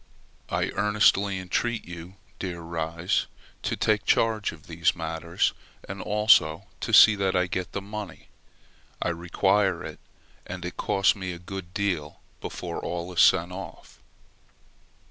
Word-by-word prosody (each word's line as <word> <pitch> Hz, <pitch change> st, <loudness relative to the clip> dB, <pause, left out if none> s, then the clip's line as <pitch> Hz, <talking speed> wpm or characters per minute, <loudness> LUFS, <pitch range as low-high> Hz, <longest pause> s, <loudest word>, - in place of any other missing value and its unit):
I -, -, 0 dB
earnestly 100 Hz, -1 st, +3 dB
entreat 110 Hz, +6 st, -2 dB
you, 85 Hz, +2 st, -9 dB, 0.2 s
dear 90 Hz, -3 st, -4 dB
Ries, 85 Hz, +1 st, -1 dB, 0.3 s
to -, -, -2 dB
take 105 Hz, -1 st, +2 dB
charge 110 Hz, -2 st, +2 dB
of 75 Hz, -, -14 dB
these 85 Hz, 0 st, +1 dB
matters, 80 Hz, +1 st, -1 dB, 0.3 s
and 95 Hz, 0 st, -6 dB
also 95 Hz, -5 st, +4 dB
to -, -, -3 dB
see 110 Hz, -, +9 dB
that 95 Hz, -1 st, 0 dB
I 90 Hz, 0 st, +3 dB
get 90 Hz, 0 st, -4 dB
the 100 Hz, -, -3 dB
money; 100 Hz, -6 st, -8 dB, 0.7 s
I -, -, 0 dB
require 90 Hz, +2 st, +1 dB
it, -, -, -8 dB, 0.5 s
and 90 Hz, 0 st, -6 dB
it 90 Hz, -, -5 dB
costs 95 Hz, 0 st, +2 dB
me 95 Hz, -2 st, -4 dB
a -, -, -7 dB
good 90 Hz, 0 st, -8 dB
deal 90 Hz, -8 st, -2 dB, 0.2 s
before 85 Hz, -2 st, -5 dB
all 85 Hz, +1 st, -4 dB
is 85 Hz, -, +4 dB
sent 85 Hz, +2 st, +5 dB
off. 95 Hz, +1 st, -9 dB
90 Hz, 145 wpm, -26 LUFS, 85-100 Hz, 0.7 s, see